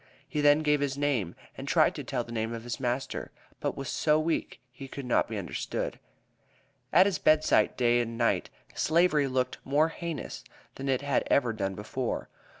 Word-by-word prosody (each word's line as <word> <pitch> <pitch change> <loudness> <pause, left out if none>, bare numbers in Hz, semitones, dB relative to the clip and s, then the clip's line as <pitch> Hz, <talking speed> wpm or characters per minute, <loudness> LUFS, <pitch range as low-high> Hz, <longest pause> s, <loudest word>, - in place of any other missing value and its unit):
He 150 - -2
then 145 +1 +5
gave 150 -1 +3
his 140 -1 -1
name, 135 -12 0 0.2
and - - -7
tried - - +4
to - - -6
tell 125 -3 -2
the 115 - -11
name 115 0 -2
of 115 - -7
his 120 +2 -4
master, 125 +1 -2 0.3
but - - -2
was 135 -1 -5
so 150 +3 +2
weak 160 +1 -1
he 135 +2 -9
could 135 0 -7
not 125 - +2
be 110 - -4
understood. 90 -5 -3 0.9
At 185 - +7
his 195 -5 0
bedside, 155 -8 +3
day 120 -1 +3
and 115 -1 -2
night, 115 -1 +1 0.2
Slavery 155 -3 +3
looked 130 -1 -1
more 150 +4 +2
heinous 160 - -5 0.3
than 135 0 -5
it 130 -1 +1
had 140 -2 +1
ever 120 -5 +3
done 95 -3 -2
before. 110 +5 -3
135 Hz, 185 wpm, -29 LUFS, 120-150 Hz, 0.9 s, At